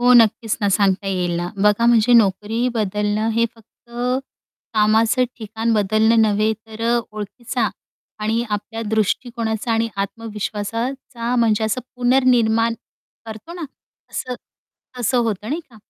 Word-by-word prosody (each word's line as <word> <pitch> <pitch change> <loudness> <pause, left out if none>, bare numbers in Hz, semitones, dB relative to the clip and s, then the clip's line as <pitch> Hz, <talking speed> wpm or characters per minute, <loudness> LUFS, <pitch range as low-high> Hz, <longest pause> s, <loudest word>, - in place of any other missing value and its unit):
हो, 245 +1 +5
नक्कीच 225 -1 +4
ना 205 - +3
सांगता 195 -1 +2
येईल 180 -2 0
ना 175 +1 -2
बघा 210 +3 +4
म्हणजे 235 0 +4
नोकरी 225 +2 +3
बदलणं 210 0 0
हे 230 +1 +2
फक्त 230 +1 -25 0.8
कामाचं 220 +3 +3
ठिकाण 225 0 -2
बदलणं 215 +2 +3
नव्हे 215 0 +2
तर 220 0 -8
अ, 240 +1 +3
ओळखीचा 215 +3 -3 0.5
आणि 225 +2 0
आपल्या 210 +2 -3
दृष्टिकोनाचा 220 +1 -1
आणि 225 0 +1
आत्मविश्वासाचा 230 +4 -3
म्हणजे 220 -2 +2
असं 220 +4 -1 0.2
पुनर्निर्माण 245 -3 +3 0.5
करतो 220 +8 -8
ना 345 -1 -5 0.5
असं 255 -1 -4 0.7
असं 245 +2 +1
होतं, 220 -3 -1
नाही 305 +5 -1
का? 235 - -18
225 Hz, 130 wpm, -21 LUFS, 210-235 Hz, 0.8 s, हो